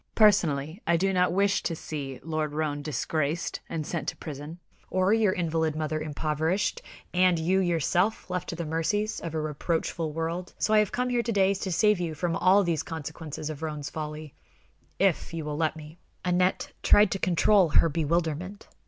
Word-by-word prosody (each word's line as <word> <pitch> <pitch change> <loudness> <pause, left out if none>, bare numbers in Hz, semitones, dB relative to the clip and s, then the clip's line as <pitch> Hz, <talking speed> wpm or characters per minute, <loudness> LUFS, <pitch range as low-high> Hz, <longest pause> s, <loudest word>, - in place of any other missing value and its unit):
Personally, 170 -5 +3
I 170 0 +4
do 195 +3 +1
not 180 0 +3
wish 200 +2 +2
to 165 - -2
see 140 -5 -6
Lord 155 -2 -2
Roane 150 -1 -1
disgraced 155 +3 -2
and 160 -2 -3
sent 170 +1 -4
to - - -3
prison, 150 +2 -7 0.3
or 185 +2 +2
your 220 -3 +3
invalid 160 -3 0
mother 155 0 -2
impoverished, 155 +4 -1 0.3
and 180 -1 +4
you, 175 +4 +2
yourself, 175 +3 +1
left 180 -1 -3
to - - -3
the 170 0 -4
mercies 185 +7 -1
of 165 -1 -6
a - - 0
reproachful 155 +1 -2
world; 165 +3 -4
so 215 - +1
I 215 - +7
have 210 -2 +1
come 250 0 -1
here 245 -1 +1
to 235 - -2
day 195 -2 +3
to 190 -1 -4
save 210 +2 +3
you 165 -3 -3
all 185 +3 +3
from - - -3
these 165 -3 0
consequences 155 -1 -6
of 155 0 -8
Roane's 150 -2 -4
folly, 155 -1 -6 0.6
if 185 -3 +1
you 160 -2 -4
will 150 -1 -3
let 160 -1 0
me." 155 +2 -11 0.3
Aneth 180 +1 +1
tried 205 -2 +5
to 195 - -1
control 185 +1 +4
her 165 - +5
bewilderment. 165 +4 -2
165 Hz, 185 wpm, -27 LUFS, 155-185 Hz, 0.6 s, I